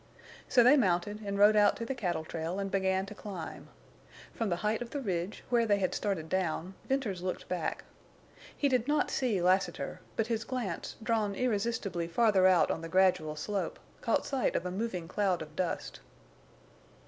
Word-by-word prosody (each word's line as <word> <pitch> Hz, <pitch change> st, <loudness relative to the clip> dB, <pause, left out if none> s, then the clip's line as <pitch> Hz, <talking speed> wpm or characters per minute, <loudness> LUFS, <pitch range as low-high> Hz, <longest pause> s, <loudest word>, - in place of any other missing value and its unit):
So 245 Hz, -, +6 dB
they 260 Hz, +5 st, +7 dB
mounted 205 Hz, -1 st, +1 dB
and 200 Hz, -1 st, -3 dB
rode 205 Hz, +1 st, +6 dB
out 205 Hz, -1 st, +5 dB
to 230 Hz, -, -5 dB
the 270 Hz, -, -2 dB
cattle 175 Hz, -10 st, -2 dB
trail 165 Hz, +3 st, -4 dB
and 195 Hz, -1 st, -3 dB
began 190 Hz, 0 st, +1 dB
to 200 Hz, -, -9 dB
climb. 190 Hz, -6 st, -7 dB, 0.7 s
From 225 Hz, -3 st, -2 dB
the 175 Hz, -, +1 dB
height 215 Hz, +2 st, +1 dB
of 240 Hz, -, -5 dB
the 285 Hz, -, -3 dB
ridge, 190 Hz, -5 st, -3 dB
where 235 Hz, -2 st, +3 dB
they 205 Hz, -1 st, +4 dB
had 185 Hz, -2 st, 0 dB
started 190 Hz, -6 st, -2 dB
down, 185 Hz, 0 st, -1 dB, 0.2 s
Venters 240 Hz, -10 st, -1 dB
looked 185 Hz, 0 st, -4 dB
back. 180 Hz, -3 st, -2 dB, 0.7 s
He 285 Hz, -, +2 dB
did 255 Hz, -2 st, +1 dB
not 295 Hz, 0 st, +1 dB
see 225 Hz, -9 st, 0 dB
Lassiter, 185 Hz, +2 st, +1 dB
but 225 Hz, -, +1 dB
his 225 Hz, -1 st, -1 dB
glance, 235 Hz, -10 st, -4 dB
drawn 220 Hz, -3 st, 0 dB
irresistibly 205 Hz, -6 st, -1 dB
farther 190 Hz, +1 st, +4 dB
out 185 Hz, -3 st, +4 dB
on 160 Hz, -, -3 dB
the 165 Hz, -, -6 dB
gradual 180 Hz, -4 st, +3 dB
slope, 195 Hz, +6 st, -3 dB, 0.2 s
caught -, -, +1 dB
sight 270 Hz, -2 st, 0 dB
of 175 Hz, -, -1 dB
a 180 Hz, -, -2 dB
moving 185 Hz, -4 st, -3 dB
cloud 190 Hz, -1 st, +1 dB
of 155 Hz, 0 st, -14 dB
dust. 180 Hz, -1 st, -3 dB
200 Hz, 185 wpm, -31 LUFS, 180-230 Hz, 0.7 s, they